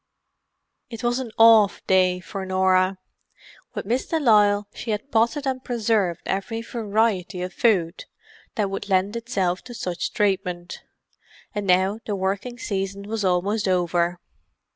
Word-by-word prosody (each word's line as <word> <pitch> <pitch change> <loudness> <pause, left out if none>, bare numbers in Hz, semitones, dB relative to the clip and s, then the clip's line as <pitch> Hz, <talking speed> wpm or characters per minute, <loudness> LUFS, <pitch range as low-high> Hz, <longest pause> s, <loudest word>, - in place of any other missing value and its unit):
It 230 -1 -8
was 240 +1 +1
an 250 -4 -5
"off" 225 -3 +6
day 185 -1 +3
for 190 +2 -6
Norah. 185 0 +2 0.8
With - - -4
Miss 240 +5 -1
de 325 - 0
Lisle 205 -6 +4
she 235 - -7
had 215 +6 -3
potted 235 +6 +1
and 260 -1 -2
preserved 215 -7 0
every 225 +4 -3
variety 215 -6 -1
of 180 - -5
food 190 -7 +1 0.5
that 205 -3 -1
would 195 +1 -5
lend 195 +3 +1
itself 195 -7 -1
to 245 -1 -9
such 180 -6 -3
treatment, 180 -4 -1 0.7
and 205 -2 -3
now 190 +3 +3
the 210 - -1
working 195 +6 -2
season 195 -2 -3
was 215 +1 -3
almost 195 +3 +1
over. 175 -1 +1
200 Hz, 140 wpm, -23 LUFS, 185-225 Hz, 0.8 s, off